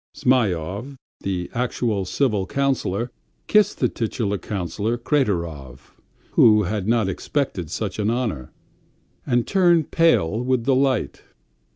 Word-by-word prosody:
Zhmyhov, 105 Hz, -, 0 dB, 0.2 s
the 90 Hz, -2 st, -3 dB
actual 115 Hz, -4 st, -1 dB
civil 105 Hz, -3 st, 0 dB
councillor, 125 Hz, -5 st, -1 dB, 0.3 s
kissed 210 Hz, -2 st, +3 dB
the 125 Hz, -, +2 dB
titular 110 Hz, -3 st, -2 dB
councillor 100 Hz, +5 st, -3 dB
Kraterov, 85 Hz, -, -2 dB, 0.4 s
who 105 Hz, -1 st, +5 dB
had 100 Hz, +1 st, -2 dB
not 115 Hz, -3 st, +2 dB
expected 95 Hz, -, -2 dB
such 105 Hz, +2 st, -4 dB
an 105 Hz, 0 st, +1 dB
honour, 115 Hz, -, -2 dB, 0.8 s
and 120 Hz, -3 st, +2 dB
turned 175 Hz, -5 st, +3 dB
pale 115 Hz, -, +3 dB
with 125 Hz, -2 st, 0 dB
delight. 130 Hz, -3 st, +1 dB
110 Hz, 110 wpm, -22 LUFS, 95-130 Hz, 0.8 s, who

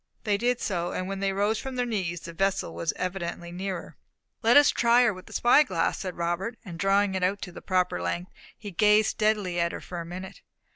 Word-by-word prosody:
They 210 Hz, -2 st, +1 dB
did 245 Hz, +3 st, +1 dB
so; 175 Hz, -3 st, -2 dB
and 185 Hz, -, -3 dB
when 195 Hz, 0 st, -4 dB
they 195 Hz, 0 st, 0 dB
rose 205 Hz, +3 st, +1 dB
from 265 Hz, -1 st, -6 dB
their 250 Hz, -1 st, 0 dB
knees 185 Hz, -7 st, -2 dB
the 170 Hz, -, -8 dB
vessel 195 Hz, -, 0 dB
was 85 Hz, 0 st, -1 dB
evidently 175 Hz, -2 st, -4 dB
nearer. 185 Hz, 0 st, -5 dB, 0.4 s
"Let 235 Hz, +4 st, +6 dB
us 290 Hz, -, +7 dB
try 240 Hz, +1 st, +4 dB
her 230 Hz, -4 st, +3 dB
with 185 Hz, 0 st, -12 dB
the -, -, -12 dB
spy 240 Hz, +5 st, +5 dB
glass," 185 Hz, -, 0 dB
said 185 Hz, -2 st, -5 dB
Robert, 175 Hz, +7 st, -2 dB
and 170 Hz, -4 st, -8 dB
drawing 195 Hz, +1 st, +2 dB
it 190 Hz, -, -1 dB
out 190 Hz, +2 st, +1 dB
to 180 Hz, -, -6 dB
its -, -, -12 dB
proper 180 Hz, -, +1 dB
length, 170 Hz, -, -3 dB, 0.3 s
he 205 Hz, -2 st, -8 dB
gazed 210 Hz, +3 st, +4 dB
steadily 210 Hz, -5 st, 0 dB
at 170 Hz, 0 st, +1 dB
her -, -, -5 dB
for 175 Hz, -2 st, -6 dB
a -, -, -7 dB
minute. 185 Hz, +2 st, -8 dB
190 Hz, 230 wpm, -27 LUFS, 175-215 Hz, 0.4 s, us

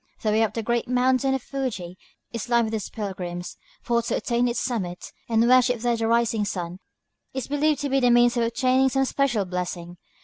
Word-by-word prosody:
The 215 Hz, -, +2 dB
way 215 Hz, +1 st, +3 dB
up 215 Hz, -2 st, 0 dB
the 225 Hz, -, -2 dB
great 235 Hz, +1 st, 0 dB
mountain 255 Hz, +2 st, +2 dB
of 265 Hz, -, -4 dB
Fuji 210 Hz, -11 st, -4 dB, 0.4 s
is 230 Hz, +1 st, -5 dB
lined 235 Hz, -1 st, +3 dB
with 220 Hz, -, -4 dB
these 215 Hz, -2 st, -3 dB
pilgrims; 180 Hz, -4 st, -5 dB, 0.3 s
for 235 Hz, -1 st, +1 dB
to 230 Hz, -, -2 dB
attain 240 Hz, 0 st, 0 dB
its 240 Hz, -1 st, -1 dB
summit, 185 Hz, -8 st, -4 dB, 0.2 s
and 230 Hz, 0 st, +3 dB
worship 250 Hz, -1 st, +4 dB
there 240 Hz, 0 st, +1 dB
the 225 Hz, -1 st, -1 dB
rising 230 Hz, -2 st, +2 dB
sun, 180 Hz, -3 st, -4 dB, 0.6 s
is 265 Hz, -3 st, -3 dB
believed 290 Hz, 0 st, +1 dB
to 285 Hz, -, -2 dB
be 270 Hz, +1 st, +2 dB
the 245 Hz, -2 st, +3 dB
means 240 Hz, 0 st, +5 dB
of 240 Hz, -, +1 dB
obtaining 255 Hz, +3 st, +2 dB
some 270 Hz, +1 st, +1 dB
special 255 Hz, -7 st, 0 dB
blessing. 180 Hz, -1 st, -5 dB
235 Hz, 205 wpm, -24 LUFS, 210-255 Hz, 0.6 s, means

